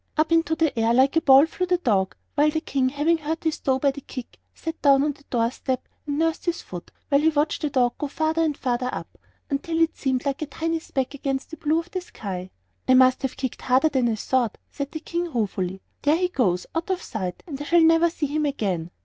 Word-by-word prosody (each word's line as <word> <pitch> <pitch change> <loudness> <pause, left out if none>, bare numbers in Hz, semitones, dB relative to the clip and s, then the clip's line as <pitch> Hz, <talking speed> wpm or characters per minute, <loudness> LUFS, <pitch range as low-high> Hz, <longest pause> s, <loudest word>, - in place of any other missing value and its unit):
Up 310 +2 +2
into 330 -1 +3
the 320 -4 +1
air 225 +1 +3
like 265 +3 +4
a 325 - +4
ball 275 -2 +7
flew 365 +3 -3
the 360 0 +3
dog, 200 - +1 0.2
while 300 +1 +4
the 315 +1 0
King, 270 -4 0
having 300 +5 +1
hurt 315 +1 -3
his 320 -2 -1
toe 265 -1 +1
by 275 +1 +2
the 280 +1 -9
kick, 255 -2 -9
sat 325 -1 -6
down 275 -1 +5
on 295 - +1
the 285 - -22
door 230 -1 0
step 260 -1 -3 0.2
and 285 0 -1
nursed 325 0 0
his 345 -1 0
foot 175 -1 -8 0.2
while 280 0 +4
he 320 - +4
watched 305 0 0
the 300 - 0
dog 245 -3 +2
go 295 - -1
farther 315 +3 0
and 305 -3 0
farther 250 0 -1
up, - - -7 0.4
until 325 +4 -1
it 330 -1 +2
seemed 260 -1 -1
like 280 +1 -1
a 310 - -2
tiny 330 +2 -2
speck 270 -4 -3
against 270 0 -3
the 320 - -7
blue 315 0 +1
of 335 +1 -4
the 370 - -3
sky. 190 - -6 0.4
"I 255 - +6
must 255 0 +5
have 265 -1 -3
kicked 260 -3 -4
harder 260 +5 +3
than 255 -5 +1
I 225 - 0
thought," 240 +1 0
said 280 0 -5
the 315 - -6
King, 345 0 -3
ruefully; 190 -6 -2 0.2
"there 295 +3 +3
he 360 0 +1
goes, 190 - +1
out 330 +3 -2
of 375 -1 -1
sight, 185 -5 -5
and 290 -4 -6
I - - -4
shall 340 +2 +4
never 330 +1 +5
see 325 -2 -3
him 300 +1 0
again!" 190 - -2
285 Hz, 245 wpm, -24 LUFS, 255-320 Hz, 0.4 s, ball